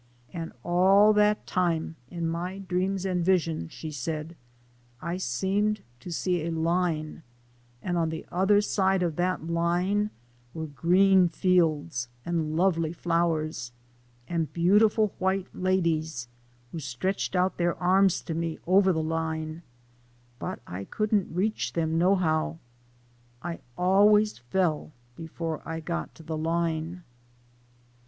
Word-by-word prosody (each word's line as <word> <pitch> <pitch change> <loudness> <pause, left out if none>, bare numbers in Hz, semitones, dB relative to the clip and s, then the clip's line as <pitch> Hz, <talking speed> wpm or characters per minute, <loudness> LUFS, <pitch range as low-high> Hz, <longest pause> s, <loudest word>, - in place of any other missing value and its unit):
"And 165 -2 -5
all 195 +4 +5
that 210 0 +3
time, 165 -3 0
in 170 -1 -3
my 175 +3 -3
dreams 190 0 -1
and 180 -2 0
visions," 165 - +1
she 155 - -7
said, 155 +4 -4 0.3
" - - -33 0.3
I 170 +5 -3
seemed 200 +3 0 0.2
to 150 - -9
see 175 0 0
a 170 - -2
line, 165 -1 -1 0.6
and 175 -1 0
on 165 -1 +1
the 160 0 -5
other 195 +3 +4
side 190 -2 +1
of 165 -3 -1
that 180 -2 0
line 175 +5 +1 0.5
were 160 -1 -3
green 180 +5 +4
fields, 160 -8 +1 0.2
and 160 -2 -1
lovely 165 -3 +2
flowers, 165 -6 -1 0.6
and 165 -3 -1
beautiful 210 +4 +3
white 190 0 +1
ladies, 165 -8 0 0.4
who 165 - -5
stretched 160 +9 -2
out 185 +1 +1
their 175 -1 +1
arms 185 +1 +3
to 165 - -4
me 165 0 -2
over 190 +2 +5
the 160 -2 0
line, 160 0 -3 0.8
but - - -5
I 95 +2 -6
couldn't 215 - 0
reach 200 +6 -1
them 165 -1 0
no 185 +3 +4
how. 160 -3 0 0.9
I 170 -1 -4 0.2
always 205 +2 +4
fell 155 +4 -1 0.2
before 165 -1 -5
I 160 0 -4
got 85 - -4
to 165 - -13
the 160 0 -4
line." 165 +1 -1
170 Hz, 135 wpm, -27 LUFS, 160-190 Hz, 0.9 s, all